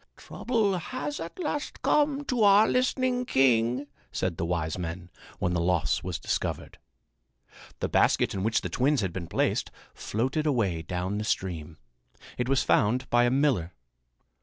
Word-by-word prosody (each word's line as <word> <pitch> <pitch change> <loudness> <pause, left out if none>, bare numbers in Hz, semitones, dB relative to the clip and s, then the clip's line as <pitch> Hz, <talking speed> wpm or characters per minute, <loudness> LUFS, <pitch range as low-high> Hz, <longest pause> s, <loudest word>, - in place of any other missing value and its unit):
"Trouble 215 -6 -1
has 145 -3 -5
at 165 +1 -7
last 295 -4 -4
come 290 -1 +2
to 250 -4 -1
our 205 +1 +6
listening 255 0 +1
king," 125 - +2 0.3
said 95 -3 -2
the 85 - -1
wise 80 -2 -1
men, 85 0 -6 0.3
when 90 - -1
the 85 - 0
loss 85 -6 +1
was 90 -2 -4
discovered. - - -3 1.0
The - - +1
basket - - +2
in 95 - -3
which 110 +3 +1
the - - -3
twins 135 +1 +1
had 95 -4 -2
been 90 -3 -5
placed - - 0 0.2
floated 130 +8 -2
away 100 - +1
down 90 +5 -3
the - - -2
stream. 85 -6 -3 0.6
It 125 +1 -1
was 135 0 +3
found 125 +5 +1
by 120 0 +4
a - - +3
miller. 125 - +1
120 Hz, 160 wpm, -27 LUFS, -, 1.0 s, our